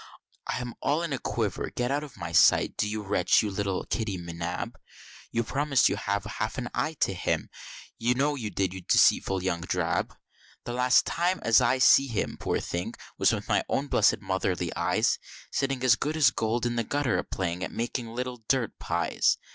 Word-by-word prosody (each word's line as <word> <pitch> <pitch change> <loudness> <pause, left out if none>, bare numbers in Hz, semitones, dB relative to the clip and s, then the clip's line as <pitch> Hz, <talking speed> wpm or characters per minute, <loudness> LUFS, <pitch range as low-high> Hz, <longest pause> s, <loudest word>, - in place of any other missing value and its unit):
I - - -1
am 125 -1 -5
all 150 +4 +1
in 165 -4 -2
a 135 - -2
quiver 110 -4 -2
get 125 +1 -2
out 145 +2 0
of 145 -7 -11
my 85 -3 -5
sight, - - +5
do, 105 - 0
you 105 0 -3
wretch, 95 -1 +3
you 105 - -2
little 95 -1 -2
Kitty 110 -4 -2
M'Nab! 85 0 -5 0.6
You 115 - 0
promised 140 +2 +1
to - - +3
have 100 0 -2
half 110 +3 -4
an 120 -1 -3
eye 155 - -1
to - - +2
him, 90 - -2 0.5
you 120 +2 +2
know 145 +3 +1
you 120 -7 -4
did, 95 -1 -1
you 95 - -7
dirty - - -26
deceitful 95 -1 +4
young 85 -2 -1
drab. 85 - -1 0.5
The 120 - -5
last 125 +1 +4
time 180 +2 0
as 115 +1 +5
ever 120 - +3
I - - 0
see 135 +1 +6
him, 115 -5 -2
poor - - -1
thing; 85 +1 -4 0.2
was - - +4
with - - -3
my - - +2
own 140 +1 -1
blessed 105 -1 +3
Motherly 95 -3 -2
eyes, - - +1 0.3
Sitting 135 -2 -1
as 125 -3 +6
good 150 +5 -2
as 140 -6 +5
gold 115 +2 -1
in 120 0 -1
the 115 - +1
gutter, 140 -3 0
a - - -2
playing 90 -1 -3
at - - -3
making 120 +1 -3
little 125 +2 -4
dirt 130 -5 0
pies. - - +1
115 Hz, 210 wpm, -27 LUFS, 95-130 Hz, 0.6 s, see